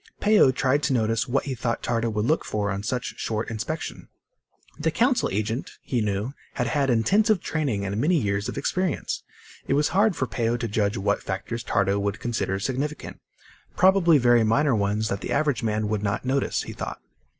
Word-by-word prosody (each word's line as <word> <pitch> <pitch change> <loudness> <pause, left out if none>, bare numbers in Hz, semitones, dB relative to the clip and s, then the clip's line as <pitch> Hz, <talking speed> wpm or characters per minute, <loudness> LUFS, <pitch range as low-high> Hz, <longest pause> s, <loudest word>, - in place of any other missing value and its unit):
Peo 210 -9 +5
tried 130 +2 +1
to 140 - +1
notice 115 0 +1
what 135 +2 +1
he 140 - -3
thought 120 -1 -2
Tardo 115 -1 0
would 105 -1 -1
look 155 +6 +2
for 105 -1 -2
on 100 0 -3
such 125 +3 -2
a - - -22
short 110 +1 -2
inspection. 115 +9 -5 0.7
The 160 +2 +1
Council 245 - +2
agent, 110 +5 -3
he 125 -3 -1
knew, 105 +5 -2 0.2
had 125 - 0
had 135 +3 +1
intensive 200 - +3
training 135 -13 -2
and 100 +3 -2
many 170 +4 +3
years 100 -3 -1
of - - -6
experience. 185 -4 -1 0.5
It 135 - +2
was 150 +1 +2
hard 200 +2 +3
for 130 - -1
Peo 115 0 -1
to 115 - -3
judge 105 0 0
what 100 +1 0
factors 100 +5 -4
Tardo 100 -2 +1
would 100 +1 -2
consider 115 -5 -1
significant 135 +7 -4 0.6
probably 185 -4 +5
very 120 -3 +4
minor 130 +6 +3
ones 105 +1 0
that 100 - -3
the - - -5
average 145 -7 +1
man 110 -1 0
would 105 -1 -1
not 105 +4 -2
notice, 135 +1 0
he - - -7
thought. - - -6
120 Hz, 195 wpm, -25 LUFS, 105-145 Hz, 0.7 s, Peo